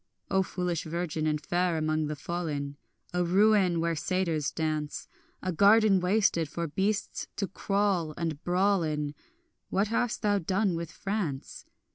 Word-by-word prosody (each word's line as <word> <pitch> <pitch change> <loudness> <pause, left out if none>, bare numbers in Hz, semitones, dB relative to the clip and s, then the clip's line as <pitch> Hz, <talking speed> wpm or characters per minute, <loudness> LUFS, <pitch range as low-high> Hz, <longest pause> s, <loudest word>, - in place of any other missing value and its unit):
O 190 - +4
foolish 180 -3 -2
virgin 160 -1 -2
and 150 -1 +1
fair 175 +2 0
among 155 0 0
the 150 - -3
fallen, 150 -3 -3 0.4
A 180 0 +2
ruin 190 -1 +4
where 165 0 0
satyrs 165 -4 0
dance, 155 -2 -3 0.4
A 185 - 0
garden 200 +3 +5
wasted 180 -4 +2
for 170 +2 -3
beasts 195 +7 -1
to 200 - -1
crawl 195 -5 0
and 160 -3 -3
brawl 190 +2 +2
in, 150 -2 -2 0.6
What 200 +2 +1
hast 230 +1 0
thou 205 -1 +3
done 190 +2 +1
with 165 -1 -4
France? 195 -10 -4
175 Hz, 145 wpm, -29 LUFS, 155-195 Hz, 0.6 s, garden